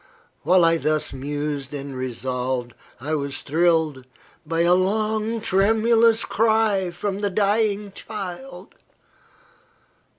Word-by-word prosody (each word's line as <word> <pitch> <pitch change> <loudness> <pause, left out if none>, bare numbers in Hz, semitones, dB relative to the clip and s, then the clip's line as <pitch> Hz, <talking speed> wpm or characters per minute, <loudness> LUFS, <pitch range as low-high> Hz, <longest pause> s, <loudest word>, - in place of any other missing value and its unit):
While 175 +3 +4
I 165 0 +4
thus 155 -1 -1
mused 145 +1 -4
and 140 -1 -6
resolved, 125 0 -3 0.3
I 145 +6 -4
was 140 -2 -3
thrilled 160 -4 +1 0.4
by 165 +1 0
a 170 +1 +4
long, 215 +4 0
tremulous 225 +3 +3
cry 220 -4 +2
from 195 +3 -4
the 205 -1 0
dying 205 +1 0
child. 205 +5 -8
175 Hz, 105 wpm, -23 LUFS, 145-210 Hz, 0.4 s, While